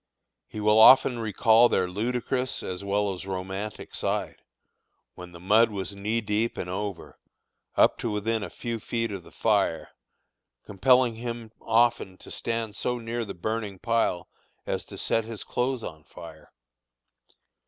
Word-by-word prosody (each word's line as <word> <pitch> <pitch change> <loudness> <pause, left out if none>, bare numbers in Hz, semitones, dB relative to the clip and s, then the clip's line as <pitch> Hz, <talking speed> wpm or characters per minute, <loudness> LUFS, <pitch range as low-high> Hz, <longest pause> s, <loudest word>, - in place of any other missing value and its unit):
He 105 - -8
will 105 +1 +4
often 125 +1 +7
recall 115 +2 +4
their 90 - +1
ludicrous 125 +6 -2
as 90 +1 -5
well 100 0 0
as 95 +1 -8
romantic 95 +2 -5
side, - - -3 0.7
when 90 -1 -11
the 85 - -12
mud 110 +6 +4
was 100 -1 -5
knee 105 +4 -1
deep 105 +2 -1
and 90 - -4
over, 100 +1 -5 0.6
up - - +4
to 115 - -2
within 110 +2 -1
a 100 - -5
few 115 +4 -5
feet 115 0 -2
of 100 -2 -5
the - - -16
fire, - - 0 0.7
compelling 125 +3 +3
him 115 -1 -6
often 115 -5 +2
to - - -13
stand 115 -2 -3
so 125 0 -1
near 115 0 -3
the 100 - -7
burning 105 +2 -3
pile 115 -4 0 0.4
as - - -3
to - - -10
set 115 - 0
his 110 -1 -7
clothes 125 -1 -2
on 80 -1 -8
fire. 80 -1 -13
110 Hz, 155 wpm, -26 LUFS, 95-115 Hz, 0.7 s, often